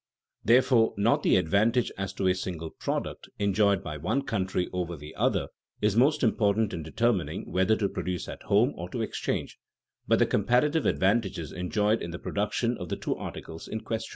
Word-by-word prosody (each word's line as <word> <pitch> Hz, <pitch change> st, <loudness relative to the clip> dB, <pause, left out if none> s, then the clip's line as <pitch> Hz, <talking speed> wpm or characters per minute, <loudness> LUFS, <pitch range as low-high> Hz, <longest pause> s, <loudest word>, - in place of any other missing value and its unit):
Therefore 120 Hz, -1 st, +4 dB
not 105 Hz, +4 st, +3 dB
the -, -, +4 dB
advantage 110 Hz, +8 st, +2 dB
as 95 Hz, 0 st, -3 dB
to 95 Hz, -1 st, -1 dB
a 90 Hz, -, +4 dB
single 85 Hz, -3 st, -5 dB
product, -, -, -4 dB
enjoyed 100 Hz, -1 st, +2 dB
by 75 Hz, -, -5 dB
one 110 Hz, -, -1 dB
country 95 Hz, -6 st, -1 dB
over 90 Hz, -1 st, -2 dB
the 75 Hz, +2 st, -10 dB
other -, -, 0 dB, 0.3 s
is 105 Hz, -1 st, +1 dB
most 140 Hz, +6 st, +3 dB
important 110 Hz, -1 st, +2 dB
in 85 Hz, -, -3 dB
determining 100 Hz, +4 st, -1 dB
whether 95 Hz, +4 st, +3 dB
to 105 Hz, -2 st, 0 dB
produce 90 Hz, -2 st, -4 dB
at -, -, -8 dB
home 115 Hz, +7 st, +3 dB
or 85 Hz, +1 st, -6 dB
to -, -, -3 dB
exchange, -, -, -3 dB, 0.5 s
but -, -, +4 dB
the -, -, +4 dB
comparative 125 Hz, +9 st, +2 dB
advantages 95 Hz, -6 st, +1 dB
enjoyed 105 Hz, +4 st, 0 dB
in 85 Hz, -, -4 dB
the 85 Hz, -, -5 dB
production 110 Hz, +5 st, -1 dB
of 90 Hz, -3 st, -6 dB
the -, -, -2 dB
two -, -, -2 dB
articles 80 Hz, 0 st, -8 dB
in 110 Hz, -, -4 dB
question. 110 Hz, 0 st, -4 dB
100 Hz, 180 wpm, -28 LUFS, 90-115 Hz, 0.5 s, Therefore